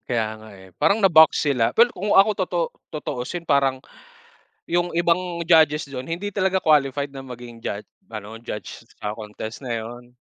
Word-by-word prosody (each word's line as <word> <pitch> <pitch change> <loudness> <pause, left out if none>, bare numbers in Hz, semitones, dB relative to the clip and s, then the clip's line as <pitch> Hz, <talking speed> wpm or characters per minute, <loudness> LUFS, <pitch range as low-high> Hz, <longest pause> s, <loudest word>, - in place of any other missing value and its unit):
Kaya 115 -3 +1
nga, 110 0 -13
eh. 95 0 -15
Parang 200 - +4
na-box 160 -5 +6
sila, 125 -6 +1
pero 235 +1 +5
kung 200 +3 -1
ako 195 +2 +7 0.2
totoo 175 -2 -1 0.2
tutuosin 155 +3 -5
parang, 140 -3 +2 0.9
yung 175 +1 0
ibang 170 0 0
judges 155 -3 +4
dun, 130 -1 -6
hindi 185 +5 -3
talaga 190 -1 +1
qualified 145 -2 +2
na 135 - -7
maging 120 -2 -10
jud 100 -1 -4 0.2
ano, 110 0 -8
judge 105 -4 -7 0.2
sa 105 0 -4
contest 110 +2 -8
na 125 -3 -4
yun. 120 +2 -10
140 Hz, 165 wpm, -23 LUFS, 115-170 Hz, 0.9 s, ako